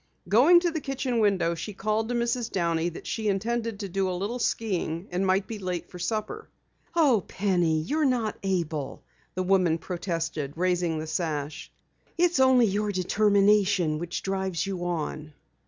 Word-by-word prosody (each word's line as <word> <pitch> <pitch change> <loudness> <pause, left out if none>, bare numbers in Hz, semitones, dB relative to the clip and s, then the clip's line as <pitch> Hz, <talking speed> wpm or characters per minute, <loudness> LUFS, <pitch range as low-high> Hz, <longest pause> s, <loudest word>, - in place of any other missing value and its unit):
Going 265 - +6
to 345 -1 +1
the 315 -2 -3
kitchen 265 -3 -2
window, 195 -5 +2
she 205 +5 -6
called 215 +2 -1
to 245 - -1
Mrs. 235 0 -1
Downey 170 -2 0
that 170 - -10
she 220 -2 -2
intended 225 +2 -1
to 200 - -3
do 190 0 -1
a 180 - -2
little 210 +7 -3
skiing 185 -7 -1
and 185 +2 0
might 190 +1 +2
be 220 -2 -6
late 180 -3 -4
for 180 - -9
dinner. 215 - -3 0.5
"Oh, 270 - +4
Penny, 175 -5 +1
you're 305 - -1
not 245 -6 +1
able," 165 -7 -2 0.3
the 185 - -1
woman 185 -3 +3
protested, 165 -4 -3
raising 175 -2 0
the 155 - -4
sash. 155 -2 -3 0.5
"It's 350 -3 +3
only 260 -2 +6
your 205 0 0
determination 200 -3 +3
which 175 +1 -4
drives 190 -2 -1
you 185 -3 -4
on." 155 -3 -4
195 Hz, 165 wpm, -27 LUFS, 170-225 Hz, 0.5 s, Going